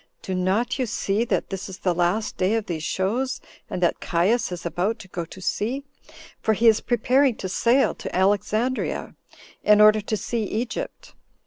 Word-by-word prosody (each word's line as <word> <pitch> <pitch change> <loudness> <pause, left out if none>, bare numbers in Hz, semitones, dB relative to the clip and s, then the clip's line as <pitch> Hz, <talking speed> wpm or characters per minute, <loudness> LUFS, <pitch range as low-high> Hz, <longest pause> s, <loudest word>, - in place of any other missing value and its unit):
Do 190 - -3
not 200 +8 0
you 255 - 0
see 205 +2 0
that - - -1
this 195 0 -5
is 190 - -8
the 180 - 0
last 180 +5 0
day 185 +4 +1
of 225 -2 -1
these 165 -3 -4
shows, 225 - -1 0.3
and 180 - -3
that 175 - +2
Caius 185 +7 +1
is 175 -1 -6
about 180 +7 -1
to 210 - -12
go 175 -2 -4
to 185 - -12
sea? 230 +8 -2 0.6
for 220 - +2
he 230 +3 +3
is 220 -1 +5
preparing 250 +2 +2
to 190 - -5
sail 235 +8 +3
to - - -7
Alexandria, 210 +6 0 0.5
in 210 0 +5
order 215 0 +7
to 215 +1 -2
see 235 +2 -2
Egypt. 235 - -4
210 Hz, 185 wpm, -24 LUFS, 185-235 Hz, 0.6 s, order